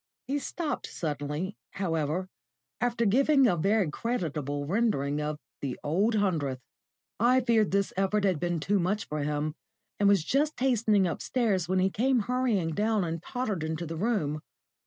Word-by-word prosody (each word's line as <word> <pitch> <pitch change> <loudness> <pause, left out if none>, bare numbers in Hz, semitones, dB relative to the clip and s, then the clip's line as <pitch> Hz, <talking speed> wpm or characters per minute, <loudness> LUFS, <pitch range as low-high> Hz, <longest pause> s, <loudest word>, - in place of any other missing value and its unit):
He 285 +2 -1
stopped 315 +1 -3
suddenly, 150 +5 -3 0.2
however, 165 -1 -1 0.5
after 235 -1 +1
giving 275 +6 +4
a 185 - +4
very 195 0 +2
creditable 150 - -2
rendering 150 -7 0
of 150 0 -2 0.2
the 135 -3 -4
"Old 195 +10 +1
Hundredth." 160 -11 0 0.6
I 250 +3 +4
feared 230 -4 +3
this 200 0 0
effort 195 +2 +1
had 185 -6 +2
been 175 0 -1
too 200 +5 +1
much 190 +5 0
for 150 - -3
him, 150 +1 -1 0.5
and 200 -1 +5
was 200 -5 +4
just 295 - +1
hastening 225 -6 +3
upstairs 190 +1 0
when 185 - +2
he 190 +1 +2
came 250 +3 +2
hurrying 230 -8 0
down 210 +3 +1
and 165 -1 -3
tottered 215 -7 -3
into 160 +2 -3
the 165 +1 -5
room. 160 -7 -1
195 Hz, 155 wpm, -28 LUFS, 155-230 Hz, 0.6 s, and